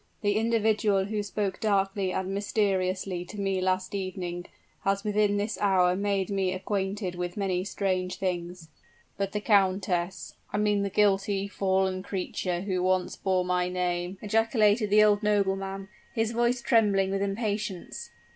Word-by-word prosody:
The 205 -1 +1
individual 215 -3 +2
who 210 +1 -2
spoke 200 -1 -3
darkly 195 -2 +1
and 190 0 -2
mysteriously 190 -3 0
to 205 +3 -9
me 195 -1 0
last 185 +1 0
evening, 180 -2 -4 0.4
has 195 0 0
within 210 -1 +2
this 210 +2 -2
hour 185 -3 +3
made 200 -1 -1
me 190 -2 0
acquainted 195 0 -2
with 175 +1 -4
many 185 -3 0
strange 185 -2 -1
things." 175 -3 -4 0.5
"But 195 0 -1
the 210 - -2
countess? 190 -3 +1 0.2
I - - -1
mean 210 -1 +2
the 200 - -1
guilty, 200 0 +2
fallen 190 -1 0
creature 185 -2 -3
who 185 -2 -1
once 185 0 +1
bore 185 -2 0
my 180 0 0
name?" 180 0 -2
ejaculated 215 0 +2
the 210 +1 +6
old 205 -1 +4
nobleman, 195 -2 0 0.3
his 225 0 +1
voice 240 +1 +1
trembling 200 -4 +3
with 195 0 -1
impatience. 200 -2 -3
195 Hz, 145 wpm, -28 LUFS, 185-205 Hz, 0.5 s, the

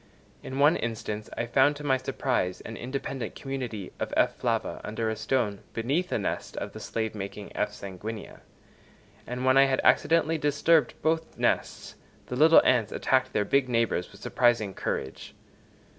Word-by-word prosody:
In 130 - -6
one 145 +4 +5
instance 110 -2 -4
I 120 - -1
found 135 +5 +3
to 145 - -9
my 135 -2 +2
surprise 130 -8 -1
an 110 - -8
independent 135 +1 -5
community 125 -8 -5
of - - -3
F. - - +3
flava - - -2
under 110 +1 -2
a - - -2
stone 110 -2 -1
beneath 145 +11 -1
a - - +1
nest 100 - -4
of - - -5
the - - -8
slave 110 -1 -3
making 100 0 -7
F. - - 0
sanguinea; 100 +3 -8 0.9
and 125 +1 -3
when 130 +1 +5
I 135 - +8
had 135 -1 +1
accidentally 165 0 +3
disturbed 150 +2 +3
both 160 +1 0
nests, - - -1 0.3
the 125 - -5
little 160 +5 +7
ants 120 -4 +3
attacked 130 0 +1
their 105 - +1
big 135 +1 +2
neighbours 115 -6 0
with - - -16
surprising 120 -5 +2
courage. 65 - -4
125 Hz, 165 wpm, -27 LUFS, 110-140 Hz, 0.9 s, I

